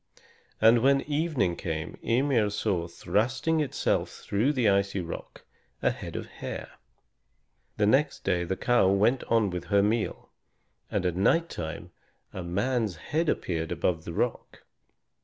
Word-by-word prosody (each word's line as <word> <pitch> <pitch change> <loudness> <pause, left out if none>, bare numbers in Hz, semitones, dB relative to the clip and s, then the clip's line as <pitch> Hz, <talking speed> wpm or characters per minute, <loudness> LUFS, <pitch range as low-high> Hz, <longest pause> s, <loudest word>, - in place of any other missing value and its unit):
And 115 +2 +6
when 135 +2 +4
evening 145 - 0
came 80 -2 -4
Ymir 120 -3 +2
saw 100 -4 -1
thrusting 120 - 0
itself 150 -3 0
through 110 +8 0
the 125 -6 +1
icy 100 0 +2
rock 85 -2 -7 0.4
a - - +4
head - - -8
of - - -4
hair. - - -7 1.1
The 105 - +3
next 140 +7 +2
day 90 0 +1
the 95 +2 -2
cow 120 -6 +3
went 110 +7 +3
on 115 -4 +2
with 90 -1 -4
her 100 -1 +3
meal, 110 +1 -1 0.6
and - - -1
at 90 -2 0
night 165 - +2
time 85 +2 -6 0.4
a 95 - -5
man's 105 +4 -1
head 155 - -1
appeared 80 - -2
above 80 -3 0
the 85 - -5
rock. - - -3
105 Hz, 145 wpm, -28 LUFS, 90-130 Hz, 1.1 s, And